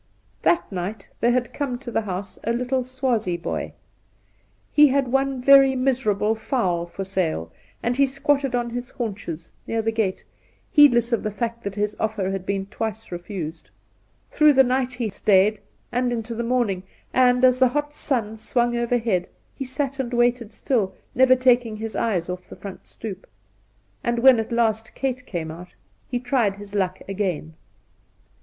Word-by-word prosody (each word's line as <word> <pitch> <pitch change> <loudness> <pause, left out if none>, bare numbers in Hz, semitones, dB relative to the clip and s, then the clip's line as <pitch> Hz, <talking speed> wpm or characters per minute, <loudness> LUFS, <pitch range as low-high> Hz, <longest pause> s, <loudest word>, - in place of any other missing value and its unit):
That 345 - +2
night 190 +3 -4
there 235 - +3
had 245 0 0
come 275 -4 -2
to 245 -1 -8
the 225 - +1
house 195 -1 -5
a 230 - 0
little 250 +2 0
Swazie 245 -8 -1
boy. 170 - -4 1.0
He 295 0 +7
had 275 -1 +1
one 270 0 +1
very 275 0 +7
miserable 245 -5 +1
fowl 190 -7 -1
for 195 +3 -5
sale, 165 - -2 0.3
and 240 +1 +1
he 275 +1 +4
squatted 275 -1 +1
on 240 -1 -1
his 245 +1 -5
haunches 195 -8 -5 0.2
near 225 0 -1
the 225 - +1
gate, 215 -4 -1 0.5
heedless 245 -6 +6
of 230 - +2
the 215 - -2
fact 230 +3 -4
that 200 -1 -4
his 210 0 -1
oflFer 215 -3 -1
had 195 -1 -4
been 195 -1 -1
twice 220 +1 -5
refused. 175 -3 -6 0.6
Through 300 -1 +5
the 265 0 +6
night 255 0 0
he 245 -2 -2
stayed, 205 +1 +3 0.3
and 245 0 0
into 230 -1 -3
the 230 - -3
morning, 235 -6 0 0.3
and 250 0 +5
as 255 0 +4
the 260 - +6
hot 295 +3 -2
sun 230 -8 -1
swung 240 +2 0
over 235 +1 +1
head 200 -7 0 0.3
he 275 - -5
sat 275 +1 -2
and 250 -2 -2
waited 240 -2 +2
still, 210 -6 -1 0.2
never 255 +1 +6
taking 245 -3 +3
his 220 0 -5
eyes 185 -7 0
off 180 0 -5
the - - -9
front 190 +1 -9
stoep. 200 -4 -8 0.8
And 235 0 0
when 250 0 +6
at 225 - -3
last 225 -2 0
Kate 255 -2 -2
came 165 -4 -4
out 175 +2 -11 0.3
he 245 - -1
tried 245 -5 +1
his 205 0 -10
luck 190 -2 0
again. 185 -5 -2
230 Hz, 175 wpm, -23 LUFS, 200-255 Hz, 1.0 s, He